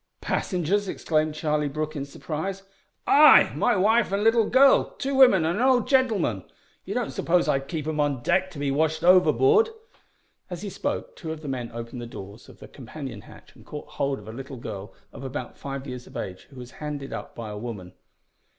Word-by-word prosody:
"Passengers?" 190 +2 -1
exclaimed 155 -4 -1
Charlie 150 -1 0
Brooke 155 +2 -4
in 140 -1 -3
surprise. 160 +7 -5 0.4
"Ay 300 +2 +7
my - - +2
wife 215 +3 +3
an' 200 +1 0
little 225 -1 +3
gurl, 270 +1 +5
two 275 +1 -2
women 245 -11 +6
and 170 +6 0
an - - +2
old 255 -2 +3
gentleman. 215 - +1 0.4
You - - -5
don't - - -1
suppose 175 +1 +1
I'd 135 0 0
keep 160 -4 -4
'em 155 -1 -2
on 140 -4 0
deck 190 0 +1
to 175 - -12
be 140 -1 -1
washed 160 +2 0
overboard?" 400 - +5 0.8
As 180 +1 -6
he 200 - -5
spoke - - -4
two 160 - -6
of 160 -1 -6
the 150 - -8
men 125 -3 -3
opened 115 +1 -7
the 120 - -6
doors 100 0 -11
of - - -15
the - - -12
companion 130 -3 -8
hatch, - - -16
and - - -17
caught 150 - -9
hold 140 -1 -2
of 105 - -13
a 110 - -7
little 135 +2 -8
girl 100 -3 -7 0.2
of - - -9
about 130 -2 -6
five 140 -1 -6
years 125 -2 -7
of - - -9
age, 90 0 -6
who 140 - -17
was 125 -1 -10
handed 145 -2 -5
up - - -7
by 115 -2 -6
a 105 - -6
woman. 105 -6 -7
150 Hz, 205 wpm, -25 LUFS, 130-190 Hz, 0.8 s, Ay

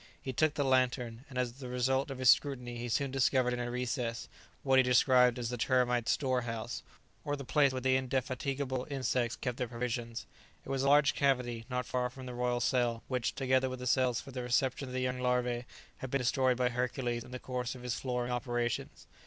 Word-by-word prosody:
He 130 - -5
took 155 +4 +2
the 145 - +1
lantern, 125 -2 +1
and 130 - -8
as 125 0 -2
the 130 - -6
result 130 +3 +1
of 135 - -5
his 130 -1 +7
scrutiny 125 -4 0
he 120 0 -4
soon 135 +3 0
discovered 130 -1 +2
in 125 - -2
a 120 0 -2
recess 120 -1 -2 0.4
what 135 -1 +4
he - - +9
described 125 -1 +4
as 120 -2 -3
the 125 - -3
termites' 125 -1 +2
"storehouse," 120 -4 -2 0.4
or 145 - -1
the 140 -2 -7
place 140 0 +3
where 130 0 -3
the 130 0 +3
indefatigable 130 0 -2
insects 125 -3 0
keep 125 -2 -4
their 125 - -2
provisions. 115 -1 -4 0.4
It - - -10
was 135 -1 0
a 140 - +2
large 145 0 +5
cavity, 125 -5 0
not 125 -1 -2
far 125 0 -1
from 130 +1 -10
the 125 - -6
royal 120 0 0
cell, 120 -2 +1
which, 125 -3 -1
together 130 -1 +2
with 130 - -5
the 125 - -7
cells 125 -1 +2
for 135 - -10
the 125 -1 -4
reception 125 +2 0
of - - -8
the 130 - -1
young 125 0 -1
larvae, 125 -1 0 0.3
had 130 - -6
been 140 - +1
destroyed 130 0 +2
by 125 -1 +2
Hercules 125 -1 -2
in - - -13
the 125 - -5
course 125 0 -4
of 125 - -11
his 125 -1 -2
flooring 125 -1 -2
operations. 120 -1 -2
125 Hz, 215 wpm, -32 LUFS, 120-130 Hz, 0.4 s, he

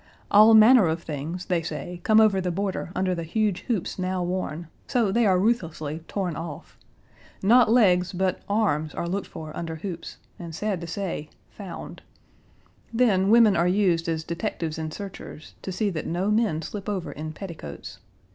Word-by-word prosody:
All 215 +2 +8
manner 220 -2 +7
of 160 +1 -2
things, 155 +4 -5
they 175 -3 0
say, 170 +2 -6
come 220 0 +5
over 210 -3 +4
the 180 - -1
border 190 0 -3
under 185 0 +1
the 170 - -3
huge 200 +3 0
hoops 215 -5 -2
now 185 0 -1
worn; 175 -2 -3 0.2
so 230 -6 +1
they 230 +1 +3
are 185 -2 +4
ruthlessly 165 -8 -1
torn 185 -5 -2
off. 165 -2 -8 0.7
Not 235 +4 +6
legs 185 -7 +4
but 185 0 -1
arms 155 -8 0
are 170 - -3
looked 195 +2 -3
Page - - -26
118 155 -1 -7
for - - -8
under 165 -1 -4
hoops, 175 -3 -7 0.2
and, 170 -2 -7
sad 200 0 -2
to 170 - -6
say, 170 -4 -4 0.2
found. 195 -5 -9 0.9
Then 215 -5 +3
women 225 -3 +6
are 170 +1 +2
used 180 -3 +2
as 160 -1 -1
detectives 170 -2 -4
and 155 -1 -4
searchers, 190 -4 -9
to 190 - -5
see 200 +2 -1
that 160 -4 -4
no 180 +5 0
men 210 -8 +1
slip 200 +5 -6
over 190 -4 -3
in 155 +2 -6
petticoats. 160 - -9
185 Hz, 180 wpm, -25 LUFS, 165-205 Hz, 0.9 s, All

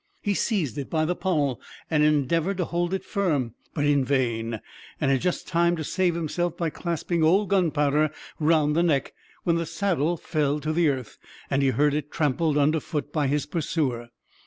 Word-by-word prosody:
He 205 - +1
seized 175 - -1
it 140 - -5
by 155 -1 +1
the 180 +3 0
pommel, 150 -10 0 0.3
and 155 -2 +2
endeavored 155 +5 +2
to 180 - 0
hold 175 +1 -1
it 190 - -2
firm, 145 - 0 0.2
but 145 -3 0
in 145 -2 +3
vain; 115 -4 0 0.4
and 140 -3 +2
had 135 - +2
just 180 0 -1
time 170 0 +2
to 160 - -4
save 180 +2 0
himself 170 +1 -2
by 165 -2 -1
clasping 170 0 -2
old 190 +5 +3
Gunpowder 155 -5 +2 0.3
round 155 -1 +3
the 170 - +3
neck, 150 -6 +1 0.3
when 170 -1 +2
the 170 - -1
saddle 175 -4 0
fell 150 -2 0
to 155 +2 -1
the 165 -1 +3
earth, 130 -4 -4 0.3
and 135 - +2
he 135 - +3
heard 145 +4 +2
it 150 -1 -2
trampled 150 +1 +1
under 150 +2 +3
foot 150 -2 -4
by 150 -3 +1
his 145 +1 0
pursuer. 145 -7 -2
155 Hz, 190 wpm, -25 LUFS, 145-170 Hz, 0.4 s, in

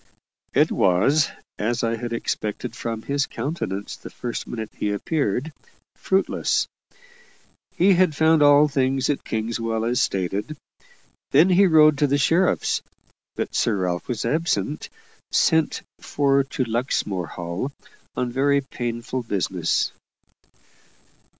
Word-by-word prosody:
It - - +4
was 110 +12 +3 0.3
as 120 +3 -1
I 115 0 +1
had 120 +1 -5
expected 115 0 -3
from 115 -1 -4
his 140 0 0
countenance 100 - -4
the - - -11
first 120 -1 -5
minute 110 -2 -5
he 105 - -2
appeared 140 +4 -1 0.4
fruitless. 190 +1 0 1.1
He 190 +2 +5
had 180 -4 +3
found 160 0 +4
all 145 +1 +6
things 135 -1 +1
at 145 - -4
Kingswell 115 0 -2
as 120 +1 +1
stated. 100 +9 -2 0.7
Then 155 +7 +5
he 190 +2 +5
rode 155 -3 +5
to 145 - +3
the 140 +1 +2
sheriff's; 165 +6 +2 0.5
but - - -3
Sir 115 - +1
Ralph 90 -2 -2
was 120 -3 -3
absent, 155 +2 -1 0.4
sent 160 -1 +2 0.2
for 140 -1 +2
to 135 -1 -2
Luxmore 110 - -1
Hall 85 +10 -4 0.4
on 125 -1 -1
very 140 +2 +2
painful 120 -1 -4
business. 95 -6 -1
125 Hz, 125 wpm, -23 LUFS, 110-145 Hz, 1.1 s, all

